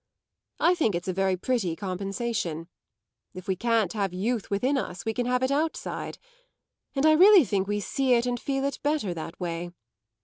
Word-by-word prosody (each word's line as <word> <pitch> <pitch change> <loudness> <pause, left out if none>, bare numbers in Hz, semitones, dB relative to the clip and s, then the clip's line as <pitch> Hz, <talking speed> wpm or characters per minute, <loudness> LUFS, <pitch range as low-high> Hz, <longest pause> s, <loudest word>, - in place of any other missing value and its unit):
I 350 - +4
think 300 - +1
it's 175 +2 -4
a 185 - 0
very 190 0 +1
pretty 190 -5 -1
compensation. 195 -3 -3 0.7
If 185 +2 -9
we 190 - +1
can't 225 -2 +1
have 195 -4 -2
youth 220 +3 -1
within 250 +8 +1
us 210 -9 -4
we 225 - -1
can 245 +1 -1
have 250 +1 +1
it 260 - +1
outside, 310 +3 -2 0.8
and 275 +2 +1
I 315 - +7
really 365 +1 +7
think 195 -3 0
we 205 0 -1
see 260 +4 +1
it 235 0 +1
and 245 -1 -1
feel 270 +1 -2
it 280 - -2
better 290 - 0
that 165 0 -7
way. 175 -1 -3
220 Hz, 190 wpm, -27 LUFS, 185-260 Hz, 0.8 s, I